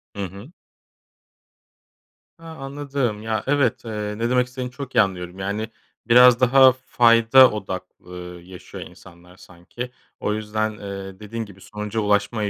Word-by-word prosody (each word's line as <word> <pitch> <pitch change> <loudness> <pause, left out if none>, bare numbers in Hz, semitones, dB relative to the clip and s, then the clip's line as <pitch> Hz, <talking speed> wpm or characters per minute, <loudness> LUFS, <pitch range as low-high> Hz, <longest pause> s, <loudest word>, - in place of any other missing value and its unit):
Hı 100 - -4
hı. 100 - -11 1.9
Ha, 165 - -16
anladım 135 -5 -3
ya, 110 0 -2
evet, 140 -5 +1
eee, 105 -1 -4
ne 115 +1 -1
demek 125 0 +2
istediğini 125 -1 -6
çok 130 0 -8
iyi - - +7
anlıyorum. 90 -2 -3
Yani, 105 +4 -3 0.4
biraz 125 +1 +7
daha 130 +1 +6
fayda 120 0 +5
odak, 95 -3 -5 0.2
ııı, 90 -1 -9
yaşıyor 90 +1 -10
insanlar 90 0 -16
sanki. 95 +8 -9 0.3
O 105 - -1
yüzden, 110 0 -2
eee, 100 -1 -8
dediğin 110 +2 -5
gibi 95 -2 -16
sonuca 105 +1 -5
ulaşmaya 105 +1 0
110 Hz, 140 wpm, -22 LUFS, 100-125 Hz, 1.9 s, iyi